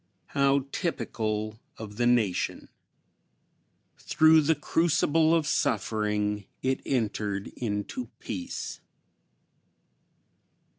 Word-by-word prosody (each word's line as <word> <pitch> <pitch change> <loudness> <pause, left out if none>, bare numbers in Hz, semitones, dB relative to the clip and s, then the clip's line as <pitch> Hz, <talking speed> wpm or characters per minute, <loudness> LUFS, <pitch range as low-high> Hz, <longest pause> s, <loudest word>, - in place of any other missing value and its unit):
How 140 -1 +2
typical 110 - -2 0.2
of 105 -2 -9
the 120 0 +2
nation! 115 -7 +1 1.3
Through 160 0 +5
the 160 +2 +2
crucible 160 +1 +2
of 160 -2 +1
suffering 105 -5 0 0.2
it 130 0 0
entered 105 -5 -1
into 115 +2 -4
peace." 90 -4 -5
120 Hz, 80 wpm, -28 LUFS, 105-150 Hz, 1.3 s, Through